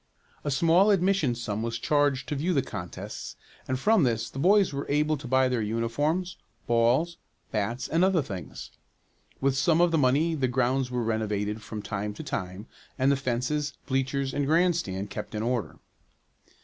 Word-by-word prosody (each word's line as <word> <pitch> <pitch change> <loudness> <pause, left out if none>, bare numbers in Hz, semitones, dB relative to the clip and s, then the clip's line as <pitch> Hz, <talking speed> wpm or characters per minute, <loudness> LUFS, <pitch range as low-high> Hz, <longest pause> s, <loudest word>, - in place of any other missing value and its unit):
A 145 - -2
small 165 +8 +4
admission 190 - +2
sum 110 -3 -3
was 115 0 -2
charged 145 0 +1
to 150 - -1
view 165 +5 0
the 135 - +2
contests 90 0 -7 0.3
and 130 - 0
from 215 +6 +4
this 115 -4 0
the 135 - -7
boys 195 +2 +4
were 140 +1 -4
able 150 +2 +2
to 140 -2 -8
buy 130 +1 +3
their 125 -3 0
uniforms, 145 - -1 0.3
balls, 120 +9 +2 0.3
bats, 115 +4 -2
and 165 +3 +2
other 185 -5 +3
things. 90 - -8 0.7
With 135 0 +2
some 160 +4 +3
of 175 -1 +4
the 165 - +2
money 145 +5 +3
the 135 -5 0
grounds 130 +1 +1
were 125 -1 -1
renovated 105 -1 -1
from 105 -1 -7
time 105 0 -4
to - - -7
time, 95 +2 -5 0.3
and 135 0 +3
the - - +3
fences, 135 +3 -2
bleachers 135 0 -1
and 145 -1 -1
grandstand 155 - +1
kept 105 +1 -6
in 105 - -2
order. 120 -1 -2
130 Hz, 175 wpm, -27 LUFS, 115-155 Hz, 0.7 s, small